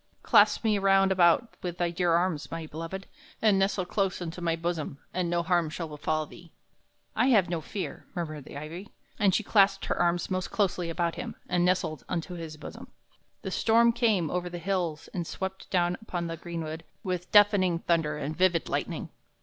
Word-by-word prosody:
Clasp - - +5
me 215 -2 +2
round 195 0 +4
about 185 +5 +4
with 175 -1 -4
thy 175 -1 0
dear 175 0 +1
arms, 170 -3 0
my 165 -1 -5
beloved, 165 +5 -6 0.3
and 210 -3 +4
nestle 195 -1 +1
close 195 +1 -1
unto 175 0 -6
my 165 -1 +1
bosom, 165 -4 -3 0.2
and 180 -1 -1
no 170 0 +1
harm 170 -2 +2
shall 165 +1 -5
befall 155 +1 -1
thee." 170 +2 -15 0.6
"I 250 - +3
have 210 -10 +4
no 170 -2 -1
fear," 195 +4 -6
murmured 155 -5 -4
the - - -9
ivy; 165 +7 -7 0.3
and 195 -3 +4
she 220 - +1
clasped 195 -2 +3
her - - 0
arms 175 +1 +1
most 185 -1 -1
closely 180 -4 0
about 170 0 -1
him - - -5
and 175 -1 +1
nestled 175 -5 0
unto 180 0 -3
his 165 -3 -7
bosom. 150 - -9 0.6
The - - -4
storm 235 +1 +4
came 215 - +2
over 180 0 -2
the 175 - -6
hills 175 -4 -2
and 175 -3 -3
swept 190 0 -5
down 175 -1 +2
upon 175 -6 -4
the 165 0 -3
greenwood 165 -1 -6 0.2
with 180 -2 -3
deafening 205 -4 +5
thunder 160 -3 0
and 150 +1 -4
vivid 180 -2 +2
lightning. - - -2
175 Hz, 190 wpm, -28 LUFS, 165-190 Hz, 0.6 s, Clasp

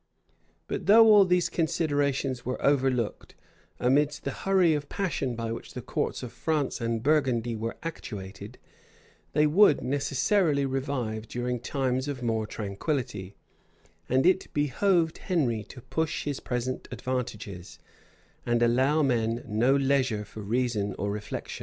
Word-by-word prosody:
But - - -4
though 225 +3 +8
all 205 -2 +7
these 180 -1 +2
considerations 145 -6 0
were 125 - -3
overlooked, 130 -5 0 0.4
amidst 145 +4 +2
the - - -2
hurry 190 -4 +2
of 145 -1 -3
passion 155 -10 -2
by 115 0 -3
which 115 - -7
the - - -4
courts - - -2
of 125 - -6
France 150 -6 -1
and 115 -1 -1
Burgundy 130 -6 +1
were 115 +1 -4
actuated, 105 -8 -7 0.8
they 150 +1 +4
would 155 +1 +5
necessarily 140 +3 +1
revive 130 -5 -3
during 125 +1 -2
times 130 +1 -1
of 135 -4 -4
more 110 -2 0
tranquillity; 105 - -4 0.7
and 130 +1 +3
it 185 +1 +2
behoved 160 +4 +1
Henry 125 - 0
to 125 - -12
push 160 +5 -2
his 145 -2 -3
present 125 +1 -3
advantages, 115 -7 -5 0.7
and 120 0 +1
allow 130 +6 +3
men 115 -3 0
no 120 +5 +3
leisure 135 -6 +1
for 105 +1 -9
reason 105 -2 -1
or 100 +2 -2
reflection. 105 0 -5
130 Hz, 135 wpm, -27 LUFS, 115-150 Hz, 0.8 s, though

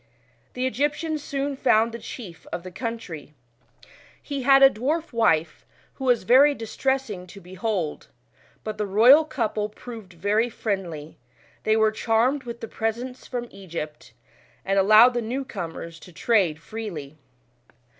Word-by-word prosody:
The 250 +1 -2
Egyptians 295 +5 -1
soon 280 0 -2
found 230 -4 +3
the 235 - -7
chief 205 -7 -9
of 170 - -4
the 185 - -8
country. 190 - -6 0.8
He 280 -2 -5
had 270 +1 +6
a 270 - +10
dwarf 300 +7 -2
wife, 165 -9 +1 0.3
who 265 - -7
was 245 -5 +3
very 275 +8 +6
distressing 225 -4 -2
to 200 +3 -12
behold; 185 -2 -3 0.6
but 215 -1 -5
the 210 - -1
royal 240 +10 +7
couple 215 -8 -2
proved 210 -6 -11
/ery 215 +5 +1
friendly; 175 -9 -4 0.5
they 220 0 +3
were 220 0 +4
charmed 235 +5 +1
with 235 -1 -7
the 225 - -5
presents 235 +4 -4
from 240 -1 -4
Egyp 170 -6 -7
f, - - -28 0.5
*uid 195 0 +3
allowed 215 +5 +7
the 240 - -1
new 255 +5 -3
comers 165 -5 -7
to 180 - -14
trade 185 -5 +2
freely. 165 -8 -7
220 Hz, 145 wpm, -24 LUFS, 190-255 Hz, 0.8 s, a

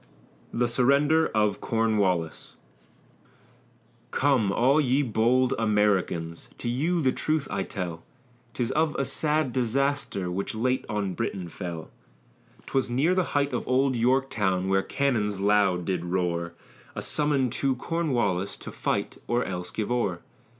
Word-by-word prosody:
THE 120 +1 +1
SURRENDER 140 +6 +3
OF 105 -2 +1
CORNWALLIS 100 -8 0 1.5
Come, 130 -8 +2
all 135 +8 +3
ye 135 +1 +2
bold 125 +2 +2
Americans, 100 -6 0
to - - -5
you 160 +9 0
the 130 - +3
truth 155 0 -1
I 100 - -1
tell, 90 -4 -5 0.5
'Tis 120 -2 -1
of 155 -1 +1
a 140 - 0
sad 150 -4 +1
disaster, 130 -6 0
which 100 +4 -3
late 125 +3 0
on 105 -3 -1
Britain 95 -6 -3
fell; 85 -2 -7 0.7
'Twas 135 -2 -1
near 140 +9 +2
the 185 0 +2
height 140 0 +1
of - - -3
Old 130 +1 +2
Yorktown, 115 -7 +1
where 95 0 +3
the - - -14
cannons 110 -8 0
loud 100 -3 +2
did 90 -2 -1
roar, 85 -1 -1 0.4
A - - -3
summons 140 -5 +1
to 135 -1 +1
Cornwallis, 120 - -1
to - - -8
fight - - -2
or 120 +1 +1
else 90 -2 -5
give 110 +1 -3
o'er. 120 -1 0
115 Hz, 140 wpm, -26 LUFS, 95-135 Hz, 1.5 s, SURRENDER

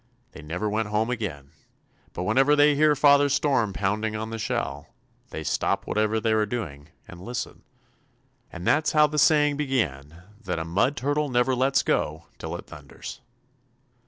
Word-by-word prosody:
They - - -11
never 85 +7 -3
went 110 +1 -1
home 110 +3 0
again, 80 - -5 0.6
but 90 - -4
whenever 135 +9 +3
they 145 0 +5
hear 150 +1 +4
Father 145 0 +5
Storm 135 -7 +1
pounding 105 +3 -1
on 110 +1 -4
the 115 - -5
shell, 75 -8 -3 0.4
they - - -6
stop - - -1
whatever 110 +1 0
they 110 0 0
are 110 -1 +2
doing 80 -11 -6 0.2
and 85 -1 -11
listen. 120 +6 -6 0.9
And 90 0 -8
that's 155 +2 +2
how 150 -1 +6
the 150 0 -1
saying 150 -1 +4
began 85 - -2 0.2
that 90 -4 -3
'a 80 - -3
Mud 105 - +1
Turtle 145 +4 0
never 125 +1 +2
lets 130 +2 +2
go 80 +2 -1
till - - -5
it - - -8
thunders.'" - - -10
110 Hz, 165 wpm, -25 LUFS, 90-140 Hz, 0.9 s, how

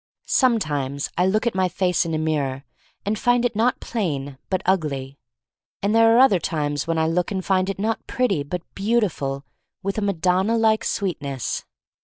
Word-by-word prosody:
Sometimes 145 - +1
I 180 - +2
look 215 +4 +1
at 235 - +1
my 185 -1 +1
face 180 -1 +1
in 165 - -1
a - - 0
mirror 145 -4 -1 0.4
and 210 +1 -1
find 245 0 +3
it 235 -3 0
not 235 +4 +2
plain 145 - -3
but 185 -2 -1
ugly. 140 -7 -1 0.6
And 205 +1 +2
there 225 0 +6
are - - +6
other 255 -8 +6
times 145 -3 -2
when 165 -1 0
I 160 - +2
look 170 +2 0
and 190 -2 -3
find 190 0 +2
it 195 - -3
not 220 +3 -2
pretty 210 - +1
but 165 +5 -4
beautiful 195 -11 -1 0.4
with 195 +2 -1
a - - -3
Madonna 190 +3 +1
like 220 -1 +3
sweetness. 145 - -2
185 Hz, 180 wpm, -23 LUFS, 150-215 Hz, 0.6 s, there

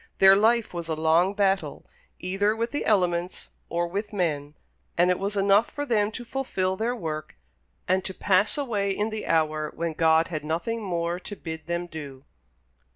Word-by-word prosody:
Their 195 0 +8
life 225 +2 +3
was 170 -2 -5
a 160 - -1
long 165 +5 +3
battle, 195 -1 0 0.3
either 200 +4 0
with 230 +1 -2
the 290 - -2
elements 180 -4 0 0.2
or 170 0 0
with 200 +4 -4
men; 150 -7 -2 0.4
and 175 +1 +4
it 180 - 0
was 200 +1 -2
enough 200 +3 +4
for 290 -1 -4
them 210 -5 +2
to 245 - -7
fulfil 195 -8 -1
their 230 +5 -1
work, 155 -7 -5 0.5
and 185 +1 +2
to 190 - -4
pass 200 +6 +2
away 215 -8 -1
in 205 +3 -1
the 215 0 -5
hour 155 -1 +1
when 170 -1 -2
God 160 +1 +3
had 155 -4 -4
nothing 170 +9 -2
more 175 -3 -2
to 205 +3 -8
bid 160 -3 -7
them 170 +1 -2
do. 145 -5 -9
185 Hz, 180 wpm, -26 LUFS, 165-210 Hz, 0.5 s, Their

